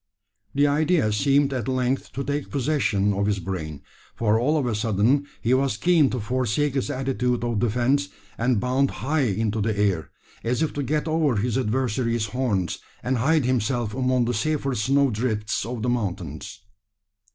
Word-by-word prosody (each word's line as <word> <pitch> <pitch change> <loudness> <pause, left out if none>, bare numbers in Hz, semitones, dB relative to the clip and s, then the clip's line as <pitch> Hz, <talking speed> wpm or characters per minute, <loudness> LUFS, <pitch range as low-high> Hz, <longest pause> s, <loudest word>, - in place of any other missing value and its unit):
This 145 +1 +4
idea 150 -4 +2
seemed 140 +4 +2
at 125 -5 -3
length 130 0 -1
to 140 - -3
take 145 +1 -3
possession 125 -8 +1
of 100 +1 0
his 105 -1 +1
brain: 80 -6 -5 0.3
for 110 -1 +2
all 150 +6 +2
on 145 - 0
a 120 - 0
sudden 110 +6 +1 0.2
he 120 - +2
was 130 -3 +1
keen 165 -4 +4
to 125 - -2
forsake 130 +5 0
his 135 -2 -1
attitude 125 -2 -1
of 120 -3 0
defence, 125 +5 +1 0.3
and 120 0 +1
bound 130 +4 +1 0.2
high 155 +3 +1
into 110 +1 -1
the 110 0 -1
air 95 -6 0 0.3
as 125 +6 0
if 160 - -1
to 145 - -2
get 150 +4 -1
over 155 -5 +2
his 110 +3 0
adversary's 120 -2 0
horns, 105 -7 -1 0.2
and 130 +1 0
hide 150 +2 +2
himself 120 -2 0
among 130 -1 +1
the 120 - -1
safer 140 +4 -1
snowdrifts 115 -3 0
of 120 -2 -4
the 125 - +1
mountains. 95 - -4
125 Hz, 170 wpm, -24 LUFS, 110-140 Hz, 0.3 s, This